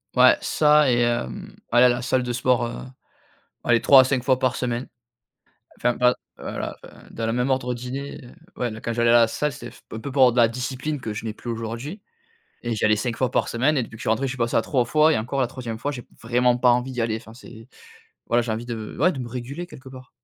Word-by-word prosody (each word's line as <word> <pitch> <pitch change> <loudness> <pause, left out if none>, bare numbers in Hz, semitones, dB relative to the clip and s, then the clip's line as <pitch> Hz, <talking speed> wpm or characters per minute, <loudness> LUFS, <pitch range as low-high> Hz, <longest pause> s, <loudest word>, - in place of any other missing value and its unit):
Ouais, - - +6
ça 150 -2 +4
et 120 - +2
hem, 120 - -2 0.2
aller 125 +1 +6
la 120 - -4
salle 125 0 0
de 120 0 -3
sport, 125 -1 +1
heu, 115 - -5 0.9
allez 120 -1 +3
3 135 -2 +8
à - - +2
5 130 -1 0
fois 130 -1 +2
par 130 -2 0
semaine. 120 0 -2 0.9
Enfin, 120 0 +1
va 125 0 +5 0.2
voilà, - - -5
enfin, - - -14
dans 115 -1 -4
la 115 - 0
même 125 +2 0
ordre 125 -1 0
d'idée, 130 +3 -6
heu. 120 - -14 0.3
Ouais, 120 -3 -1
quand 115 - -2
j'allais 120 0 +2
à - - +5
la 115 -1 +6
salle, 150 +5 -2
c'était 120 0 -9
f - - -18
un 110 - -4
peu 135 +4 -6
pour 130 -3 +5
de - - -7
la 115 -1 +6
discipline 130 +4 -4
que 110 -3 -4
je 110 +2 -6
n'ai 110 - -3
plus 120 - -7
aujourd'hui. 115 - -5 0.6
Et 120 -1 -2
j'y - - -2
allais 110 0 +4
5 115 +2 -2
fois 130 -2 0
par - - 0
semaine 135 +6 +1
et 130 - +2
depuis 115 - -9
que - - -15
je - - -9
suis - - -3
rentré, 115 +5 +1
je - - -3
suis 135 - -6
passé 115 0 0
à 115 - +3
3 125 -4 +1
fois, 155 +5 +4
et - - +1
encore, 125 +5 -2
la 125 - +2
3e 120 -3 -6
fois, 145 +5 -2
j'ai 120 -3 -8 0.2
vraiment 120 +1 +2
pas 125 0 +4
envie 125 +2 0
d'y 125 - -3
aller. 110 -1 0
Enfin, 110 0 -12
c'est 115 -1 -13 0.6
voilà, 120 +1 +2
j'ai 115 -2 -3
envie 115 +2 -4
de, 110 -3 -6
ouais, 180 - +4
de 135 - -7
me 120 -2 -5
réguler, 130 +8 -6
quelque 130 -6 -13
part. 130 -1 -12
125 Hz, 260 wpm, -23 LUFS, 115-130 Hz, 0.9 s, 3